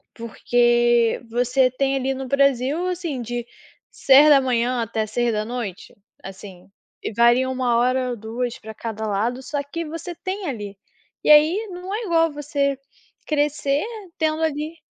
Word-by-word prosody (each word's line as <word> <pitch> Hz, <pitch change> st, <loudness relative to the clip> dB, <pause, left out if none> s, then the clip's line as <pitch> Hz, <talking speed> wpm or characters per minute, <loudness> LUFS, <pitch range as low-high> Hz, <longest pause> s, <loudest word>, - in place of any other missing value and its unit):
porque 240 Hz, 0 st, +2 dB
você 250 Hz, +2 st, +2 dB
tem 270 Hz, +2 st, 0 dB
ali 270 Hz, 0 st, -1 dB
no 265 Hz, 0 st, -6 dB
Brasil, 275 Hz, +4 st, +1 dB
assim, 340 Hz, -7 st, -3 dB
de, 240 Hz, +1 st, -5 dB, 0.4 s
6h 260 Hz, -4 st, +4 dB
até 220 Hz, -1 st, -2 dB
18h, 220 Hz, -2 st, -3 dB, 0.3 s
assim, 190 Hz, -1 st, -11 dB, 0.3 s
e -, -, -4 dB
varia 240 Hz, +3 st, +4 dB
1 250 Hz, -2 st, 0 dB
hora 255 Hz, +1 st, +1 dB
ou 245 Hz, -, -3 dB
2 230 Hz, +2 st, -4 dB
pra 220 Hz, 0 st, -10 dB
cada 220 Hz, -1 st, -5 dB
lado, 230 Hz, +6 st, -1 dB
só 285 Hz, +1 st, -3 dB
que 335 Hz, +4 st, -5 dB
você 330 Hz, +3 st, -7 dB
tem 380 Hz, +2 st, -5 dB
ali. 205 Hz, -6 st, -6 dB, 0.5 s
E, -, -, +2 dB
aí, 315 Hz, +9 st, +5 dB
não 365 Hz, +2 st, -6 dB
é 455 Hz, +2 st, -3 dB
igual 330 Hz, -4 st, +2 dB
você 280 Hz, -1 st, -1 dB, 0.5 s
crescer 290 Hz, 0 st, 0 dB, 0.3 s
tendo 315 Hz, 0 st, 0 dB
ali 310 Hz, +1 st, -2 dB
255 Hz, 140 wpm, -22 LUFS, 235-295 Hz, 0.5 s, aí